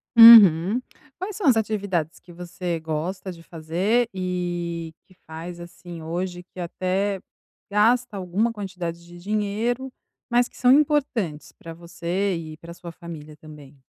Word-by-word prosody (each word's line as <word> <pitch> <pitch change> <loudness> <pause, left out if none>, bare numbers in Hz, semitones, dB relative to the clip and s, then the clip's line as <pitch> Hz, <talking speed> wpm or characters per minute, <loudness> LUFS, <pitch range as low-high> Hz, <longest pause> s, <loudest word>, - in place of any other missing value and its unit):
Uhum. 220 -2 +9 0.4
Quais 380 +2 -5
são 395 -7 -1
as 245 -4 +5
atividades 200 -7 -2
que 175 - -17
você 175 0 -5
gosta 160 +4 -4
de 165 -1 -12
fazer 180 +9 0
e 175 -3 -3
que 185 - -23
faz, 165 +2 -8
assim, 175 -1 -10
hoje, 175 +2 -4
que 185 0 -14
até 185 +3 -1 0.5
gasta 215 0 +2
alguma 190 +5 0
quantidade 180 -5 -6
de 175 0 -14
dinheiro, 215 +6 -2 0.4
mas 245 0 +3
que - - -20
são 250 0 +4
importantes 270 - +1
pra 165 0 -11
você 175 +3 -3
e 155 -2 -7
pra 170 +1 -11
sua 170 -1 -10
família 160 -3 -10
também? 150 -2 -14
180 Hz, 140 wpm, -24 LUFS, 170-210 Hz, 0.5 s, Uhum